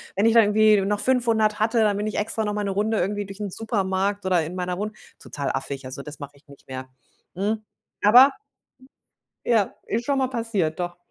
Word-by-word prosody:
wenn 200 Hz, -, +2 dB
ich 230 Hz, -, +4 dB
da 230 Hz, -, +7 dB
irgendwie 215 Hz, 0 st, +4 dB
noch 205 Hz, +1 st, -1 dB
500 230 Hz, -5 st, +2 dB
hatte, 225 Hz, +2 st, +2 dB
dann 205 Hz, -2 st, +2 dB
bin 210 Hz, +1 st, -2 dB
ich 215 Hz, -, -3 dB
extra 220 Hz, +1 st, -1 dB
noch 210 Hz, -, -2 dB
mal 210 Hz, -, -2 dB
'ne 200 Hz, -, -1 dB
Runde 215 Hz, +3 st, 0 dB
irgendwie 205 Hz, +3 st, -1 dB
durch 195 Hz, +1 st, -10 dB
'n 205 Hz, -, -3 dB
Supermarkt 200 Hz, -1 st, -1 dB
oder 180 Hz, -3 st, +2 dB
in 175 Hz, -, -7 dB
meiner 180 Hz, -1 st, -3 dB
Wohnung 210 Hz, +2 st, -4 dB, 0.3 s
total 140 Hz, -2 st, -4 dB
affig. 135 Hz, 0 st, -5 dB
Also 135 Hz, +2 st, -7 dB
das 150 Hz, -1 st, -10 dB
mache 145 Hz, 0 st, -8 dB
ich 140 Hz, -, -25 dB
nicht 140 Hz, -1 st, -17 dB
mehr. 130 Hz, 0 st, -6 dB, 0.5 s
Hm, 210 Hz, +4 st, -1 dB, 0.4 s
aber 250 Hz, +7 st, +8 dB, 1.1 s
ja, 220 Hz, -4 st, +2 dB
ist 230 Hz, +2 st, -2 dB
schon 280 Hz, 0 st, +1 dB
mal 265 Hz, -, +1 dB
passiert, 215 Hz, -10 st, -2 dB
doch. 175 Hz, 0 st, -4 dB
205 Hz, 210 wpm, -24 LUFS, 180-220 Hz, 1.1 s, aber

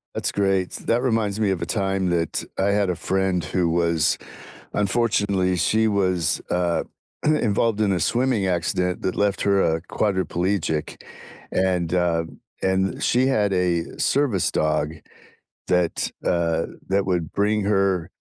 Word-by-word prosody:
That's -, -, -1 dB
great, 95 Hz, -2 st, +1 dB
that 120 Hz, +2 st, -1 dB
reminds 110 Hz, -4 st, 0 dB
me 105 Hz, -3 st, +2 dB
of 90 Hz, -, -2 dB
a 85 Hz, -, -3 dB
time 95 Hz, -3 st, 0 dB
that 85 Hz, -2 st, -1 dB
I 95 Hz, -, +1 dB
had 100 Hz, -2 st, +1 dB
a 90 Hz, -, 0 dB
friend 95 Hz, -1 st, 0 dB
who 85 Hz, +2 st, 0 dB
was 85 Hz, -1 st, +2 dB, 0.6 s
unfortunately, 100 Hz, -3 st, +1 dB
she 110 Hz, +5 st, +2 dB
was, 90 Hz, -6 st, +1 dB
uh, 90 Hz, -1 st, 0 dB, 0.4 s
involved 115 Hz, -7 st, +1 dB
in 105 Hz, -2 st, +2 dB
a 90 Hz, -, 0 dB
swimming 120 Hz, +2 st, +1 dB
accident 90 Hz, 0 st, -1 dB
that 95 Hz, -, -1 dB
left 100 Hz, -1 st, +1 dB
her 100 Hz, -1 st, +3 dB
a 80 Hz, -2 st, +1 dB
quadriplegic, 95 Hz, -4 st, -1 dB, 0.5 s
and, 90 Hz, -2 st, 0 dB
uh, 85 Hz, -2 st, +1 dB, 0.4 s
and 95 Hz, 0 st, 0 dB
she 125 Hz, +2 st, +2 dB
had 105 Hz, -7 st, +2 dB
a 90 Hz, -2 st, 0 dB
service 130 Hz, -10 st, +1 dB
dog 75 Hz, 0 st, 0 dB, 0.7 s
that, 90 Hz, -2 st, +1 dB
uh, 85 Hz, -2 st, +1 dB, 0.2 s
that 100 Hz, +1 st, +1 dB
would 90 Hz, -4 st, -1 dB
bring 105 Hz, +1 st, +1 dB
her, 95 Hz, -3 st, +1 dB
95 Hz, 140 wpm, -23 LUFS, 85-100 Hz, 0.7 s, her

